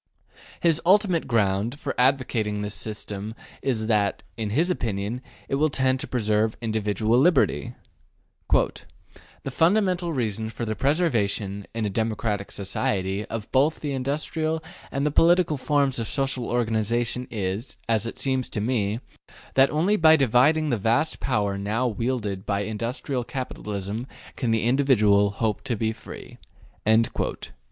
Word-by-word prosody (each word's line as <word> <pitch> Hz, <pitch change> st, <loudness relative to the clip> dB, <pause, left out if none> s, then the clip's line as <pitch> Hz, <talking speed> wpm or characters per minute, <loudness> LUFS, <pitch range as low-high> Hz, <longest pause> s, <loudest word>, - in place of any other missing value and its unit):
His 165 Hz, -2 st, +3 dB
ultimate 185 Hz, -2 st, +3 dB
ground 110 Hz, +3 st, +1 dB
for 145 Hz, -, -3 dB
advocating 125 Hz, -5 st, +1 dB
this 105 Hz, 0 st, -3 dB
system 105 Hz, 0 st, -5 dB, 0.3 s
is 120 Hz, -5 st, -1 dB
that, 105 Hz, -3 st, +1 dB
in 110 Hz, -1 st, -3 dB
his 160 Hz, -, +2 dB
opinion, 110 Hz, -, -2 dB, 0.3 s
it -, -, -5 dB
will 155 Hz, -, +4 dB
tend 130 Hz, -1 st, +1 dB
to -, -, -6 dB
preserve 110 Hz, -2 st, +1 dB
individual 110 Hz, +1 st, +1 dB
liberty: 135 Hz, -, +2 dB, 0.8 s
``The 135 Hz, -, -3 dB
fundamental 180 Hz, +2 st, +2 dB
reason 110 Hz, -5 st, -2 dB
for 115 Hz, +2 st, -5 dB
the 110 Hz, -, -1 dB
preservation, 105 Hz, -, 0 dB
in 115 Hz, -2 st, -1 dB
a -, -, 0 dB
democratic 110 Hz, -1 st, -1 dB
Society, 95 Hz, 0 st, -2 dB
of 110 Hz, -2 st, -6 dB
both 145 Hz, +4 st, +2 dB
the 145 Hz, -, -2 dB
industrial 155 Hz, +4 st, -2 dB, 0.3 s
and 140 Hz, +1 st, -1 dB
the 150 Hz, -, +2 dB
political 170 Hz, +1 st, +4 dB
forms 140 Hz, -2 st, +1 dB
of 115 Hz, -, -2 dB
Social 135 Hz, -3 st, -1 dB
organization 120 Hz, +1 st, 0 dB
is, 100 Hz, +3 st, -3 dB
it 115 Hz, 0 st, 0 dB
seems 130 Hz, -2 st, -1 dB
to -, -, -3 dB
me, 110 Hz, -1 st, 0 dB, 0.5 s
that 135 Hz, +1 st, +5 dB
only 180 Hz, +8 st, +2 dB
by 160 Hz, -3 st, +7 dB
dividing 145 Hz, +3 st, +3 dB
the 120 Hz, -, +2 dB
vast 115 Hz, +9 st, +1 dB
power 100 Hz, -5 st, 0 dB
now 110 Hz, +5 st, -1 dB
wielded 110 Hz, -4 st, -2 dB
by 100 Hz, -1 st, 0 dB
industrial 120 Hz, +5 st, -3 dB
capitalism 105 Hz, -3 st, -5 dB, 0.3 s
can 125 Hz, -, -2 dB
the 115 Hz, -1 st, +2 dB
individual 110 Hz, -6 st, +4 dB
hope 105 Hz, +1 st, -2 dB
to 125 Hz, -3 st, -1 dB
be 110 Hz, +1 st, -1 dB
free'' -, -, -11 dB, 0.5 s
(p. 110 Hz, +1 st, +2 dB
115 Hz, 140 wpm, -25 LUFS, 105-140 Hz, 0.8 s, by